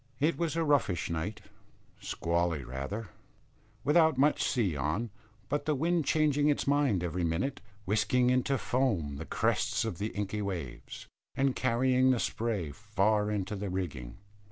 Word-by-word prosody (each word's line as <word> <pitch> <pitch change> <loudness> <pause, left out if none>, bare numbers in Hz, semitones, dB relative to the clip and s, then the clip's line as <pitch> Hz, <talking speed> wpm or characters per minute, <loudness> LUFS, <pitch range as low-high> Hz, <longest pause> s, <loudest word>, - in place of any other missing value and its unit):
It 155 +4 +2
was 165 -2 -1
a 165 - +1
roughish 140 - +1
night, 85 +6 -3 0.6
squally 85 -3 -1
rather, 70 - -5 0.7
without 160 0 +4
much 145 +3 +3
sea 105 - +1
on, 75 - -1 0.4
but 145 +4 -1
the 150 - +1
wind 165 +2 +1
changing 150 0 +3
its 145 - +1
mind 140 -10 +2
every 90 +1 -2
minute, 90 +12 -1 0.2
whisking 110 +5 +2
into 130 +2 +2
foam 105 - 0
the 80 - -6
crests - - 0
of 85 - -4
the 105 - -1
inky 105 0 -3
waves, 85 -11 -5 0.3
and 135 -1 +1
carrying 130 +1 +3
the 130 -2 +3
spray 110 -12 -2
far 105 +2 +1
into 105 0 -2
the 100 0 -4
rigging. 75 -10 -4
110 Hz, 150 wpm, -30 LUFS, 90-135 Hz, 0.7 s, without